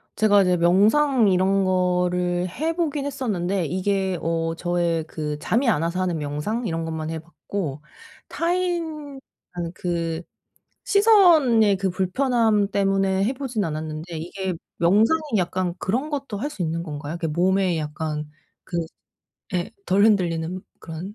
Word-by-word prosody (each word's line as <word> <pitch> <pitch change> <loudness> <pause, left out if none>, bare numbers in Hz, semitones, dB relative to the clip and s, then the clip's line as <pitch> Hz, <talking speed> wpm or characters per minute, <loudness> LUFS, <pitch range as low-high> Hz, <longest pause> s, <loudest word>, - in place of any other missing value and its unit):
제가 205 -2 +5
이제 180 -1 +3
명상 215 - +4
이런 190 +1 +3
거를 180 -1 +1
해보긴 310 - -2
했었는데 200 -10 -1
이게 190 +2 0
어 165 0 -1
저의 175 -2 0
그 150 -2 -4
잠이 240 - +1
안 165 -9 +3
와서 170 +2 -1
하는 180 -3 0
명상 150 +11 -3
이런 165 -1 -2
것만 160 -1 -4
해봤고 160 -1 -5 0.5
타인의 335 -5 -2 0.5
그 170 -2 -2 0.6
시선의 340 - +5
그 190 0 0
불편함 210 +2 +1
때문에 195 -1 +1
해보진 250 -2 -2
않았는데 155 +1 -5
이게 185 +3 -4 0.2
명상이 215 - +3 0.2
약간 180 0 -1
그런 250 +10 -1
것도 275 -8 -4
할 285 +8 -3
수 200 - -7
있는 165 0 -1
건가요? 150 -1 -6
그게 165 - -2
몸에 180 +2 +1
약간 150 0 -4 0.4
그 175 - -7 0.8
예. 175 +4 -1 0.2
덜 195 +3 +4
흔들리는 180 -4 +1 0.2
그런 165 +5 -7
185 Hz, 265 characters per minute, -23 LUFS, 170-225 Hz, 0.8 s, 제가